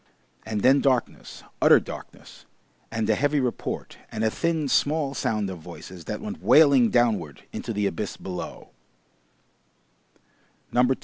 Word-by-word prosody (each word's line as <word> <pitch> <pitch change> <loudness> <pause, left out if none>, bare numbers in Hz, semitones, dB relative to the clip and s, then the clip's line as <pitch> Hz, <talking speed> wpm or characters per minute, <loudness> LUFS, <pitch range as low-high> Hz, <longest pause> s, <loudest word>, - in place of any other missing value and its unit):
And 110 -2 -2
then 135 +4 +5
darkness, 130 -4 -1 0.2
utter - - +7
darkness, - - -11 0.4
and 110 -1 -1
a - - +4
heavy 145 +1 +1
report 125 -3 -4
and 110 - -3
a 110 - +2
thin 165 0 -1
small 145 +1 +1
sound 105 -6 -1
of 90 - -8
voices 85 +1 -11
that - - -4
went 215 +2 -6
wailing 140 -6 +6
downward 105 - +1
into - - -5
the 105 -2 -1
abyss 100 +1 -3
below. 90 -2 -7
120 Hz, 130 wpm, -25 LUFS, 105-140 Hz, 0.4 s, utter